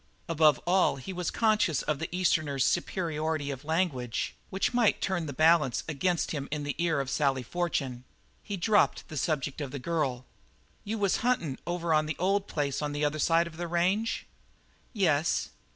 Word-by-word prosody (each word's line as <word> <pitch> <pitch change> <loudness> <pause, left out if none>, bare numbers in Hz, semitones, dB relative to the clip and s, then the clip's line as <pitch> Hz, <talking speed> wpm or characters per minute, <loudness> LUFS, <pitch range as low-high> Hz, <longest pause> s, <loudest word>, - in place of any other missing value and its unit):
Above 155 -4 +4
all 185 -2 +3
he 140 +8 -7
was 180 -1 -2
conscious 215 - +2
of 150 -2 -1
the 160 - -3
Easterner's 155 -7 +1
superiority 160 -4 -1
of 135 0 -7
language, 150 -8 -1 0.2
which 190 +5 -1
might 240 -3 +3
turn 180 -5 -1
the - - -4
balance 155 -2 +3
against 165 +3 0
him 140 -3 -3
in 150 0 -3
the 145 -1 -2
ear 165 -3 +1
of 135 - -2
Sally 135 -1 +1
Fortune. 135 -5 -2 0.4
He 200 - -5
dropped 205 +4 +2
the 155 - -7
subject 145 -1 -1
of 140 - -3
the 140 - -5
girl. 135 -4 -2 0.6
"You 220 +2 -3
was 200 -3 +2
huntin' 200 - 0
over 175 -1 0
on 155 0 +3
the 155 - -3
old 195 +2 +1
place 145 -2 -2
on 145 -1 -2
the 145 +1 0
other 150 +1 -1
side 165 +2 +3
of 165 -2 -10
the 175 0 -3
range?" 185 +7 0 0.7
"Yes." 170 - +1
160 Hz, 180 wpm, -29 LUFS, 145-180 Hz, 0.7 s, Above